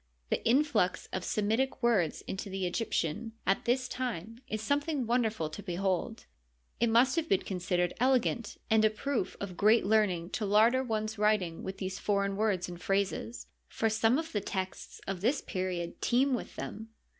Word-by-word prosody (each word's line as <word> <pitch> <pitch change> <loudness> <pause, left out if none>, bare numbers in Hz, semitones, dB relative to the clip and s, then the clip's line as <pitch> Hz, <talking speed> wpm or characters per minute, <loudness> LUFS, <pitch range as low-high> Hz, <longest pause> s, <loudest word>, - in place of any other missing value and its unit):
The - - 0
influx 255 -7 +2
of 185 - -2
Semitic 225 +7 0
words 205 -10 +2
into 195 +1 -5
the 190 -1 -2
Egyptian 220 +2 -1
at 195 - +1
this 255 +2 +1
time 230 -4 -4
is 215 -4 -3
something 285 +3 0
wonderful 225 -7 +1
to 205 - -7
behold. 190 +3 -2 0.5
It 235 +1 +3
must 240 +5 +4
have 325 -1 0
been 195 - +3
considered 180 -1 -1
elegant 245 -3 +1
and 220 -1 +4
a 215 - +6
proof 230 +1 -2
of 195 -3 -5
great 215 +4 +4
learning 195 -5 +2
to 220 - -2
larder 225 +6 +4
one's 220 -2 -2
writings 210 -6 +1
with 190 0 -5
these 190 0 -4
foreign 200 -1 0
words 205 -3 0
and 175 0 -8
phrases, 200 +5 -1 0.2
for 225 0 0
some 225 +3 +3
of 325 +1 -3
the 205 - -1
texts 190 -1 -5
of 190 -2 -4
this 255 +7 +2
period 185 -3 -4
teem 260 +3 +3
with 245 - -4
them. 220 +2 -6
215 Hz, 170 wpm, -31 LUFS, 190-235 Hz, 0.5 s, a